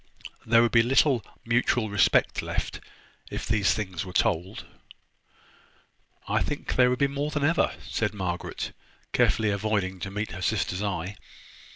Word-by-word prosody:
There 115 +1 +6
would 120 - +2
be 115 - +6
little 130 0 +3 0.2
mutual 115 -1 +1
respect 105 -2 +3
left - - -3 0.5
if - - -5
these 105 -2 +2
things 95 -6 -3
were 95 - -8
told." 95 0 0 1.6
"I - - +1
think - - -3
there 125 -1 +5
would 125 - 0
be 140 - +3
more 140 +2 -2
than 150 -1 -2
ever," 160 +3 +2
said 105 -2 -1
Margaret, 90 -3 -4 0.4
carefully 110 -1 +3
avoiding 100 -2 -1
to 95 - -4
meet 105 +2 -4
her 85 - -7
sister's 90 +2 0
eye. 100 -1 -3
105 Hz, 150 wpm, -27 LUFS, 95-120 Hz, 1.6 s, There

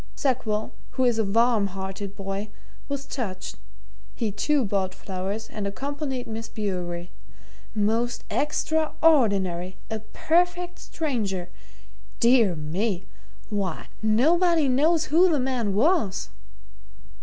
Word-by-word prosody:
Sackville, 225 -6 0 0.2
who 260 - +1
is 235 -2 +3
a - - +4
warm 225 0 +3
hearted 195 +1 -5
boy, 195 +1 -4 0.4
was 280 -1 -3
touched 195 - -4 0.6
he, 220 -3 -1
too, 270 +6 +1
bought 190 -2 -1
flowers 195 +3 -4
and 205 -2 -4
accompanied 270 +3 -3
Miss 225 0 -5
Bewery. 180 -4 -3 0.6
Most 225 +3 +1
extraordinary! 280 - +2
A 220 - -1
perfect 355 +10 0
stranger! 210 - -2 0.7
Dear 235 -6 +5
me 175 +5 -2 0.5
why, 195 -5 -2
nobody 315 +9 +4
knows 310 +6 +3
who 360 +3 +7
the 305 -4 +2
man 250 -6 0
was!" 265 - +2
220 Hz, 110 wpm, -26 LUFS, 195-280 Hz, 0.7 s, who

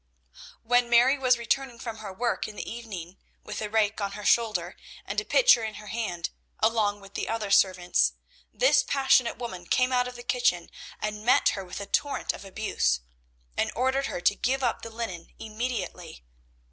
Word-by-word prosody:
When 245 +1 +3
Mary 245 +4 +5
was 255 -2 +4
returning 240 +1 -1
from 230 -2 -6
her 210 -3 -7
work 235 +6 -1
in 215 - -9
the - - -6
evening 195 -6 -7 0.2
with 210 0 -6
a 210 - -3
rake 215 -1 +1
on 200 0 -2
her 210 0 -7
shoulder 210 -7 +2 0.3
and 210 +1 -1
a - - -8
pitcher 480 - +5
in 215 -1 -4
her 210 -1 -10
hand, 180 -8 -3 0.3
along 215 -2 +1
with 195 0 -14
the - - -3
other 220 -3 -2
servants, 185 -3 +3 0.4
this - - +4
passionate 265 - +2
woman 185 -8 -7
came 255 +6 +2
out 250 0 +2
of 250 - -8
the 240 - -9
kitchen 210 -9 +1 0.3
and 210 0 -4
met 245 - +5
her 195 - -3
with 180 +1 -7
a 200 - -5
torrent 285 +7 0
of - - -9
abuse, 190 - 0 0.5
and - - 0
ordered 265 +3 +1
her 175 - -4
to 175 - +4
give 265 +5 -1
up 240 - 0
the 230 - -7
linen 220 -7 -5
immediately. 220 - -5
220 Hz, 185 wpm, -27 LUFS, 200-245 Hz, 0.5 s, Mary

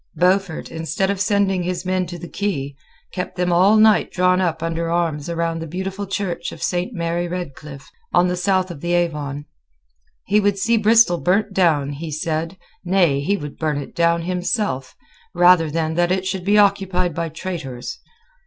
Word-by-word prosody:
Beaufort, 185 -1 +1
instead 165 +4 -1
of 200 -1 -3
sending 200 -2 +1
his 180 0 -3
men 185 -1 0
to 175 - -7
the 175 - -8
quay, 145 -7 -3 0.4
kept 180 - -4
them 180 -1 0
all 190 +5 +5
night 215 0 +4
drawn 180 0 +2
up 165 -3 -1
under 165 0 -2
arms 165 -2 -1
round 165 -1 -2
the 165 - -5
beautiful 190 +4 -4
church 185 -3 -3
of - - -8
Saint 180 +5 -1
Mary 170 -3 -2
Redcliff, 150 -5 -7 0.2
on 180 - +4
the 180 - -1
south 185 0 0
of 150 -5 -9
the 175 0 -1
Avon. 150 -5 -1 0.8
He 205 +2 +3
would 205 -1 +1
see 230 +4 +2
Bristol 220 -4 +4
burnt 195 +4 +1
down, 155 -7 +2
he 155 +3 -6
said, 160 +3 -3 0.3
nay, 175 -6 +2
he 195 +8 0
would 145 -4 -8
burn 155 -2 0
it 145 - -6
down 170 0 +2
himself, 180 - -2 0.4
rather 175 -2 +5
than 160 +1 -1
that 175 +1 +1
it 190 0 0
should 190 -1 -3
be 205 +1 +4
occupied 195 -4 +2
by 165 +1 -3
traitors. 165 - -6
175 Hz, 180 wpm, -21 LUFS, 165-190 Hz, 0.8 s, all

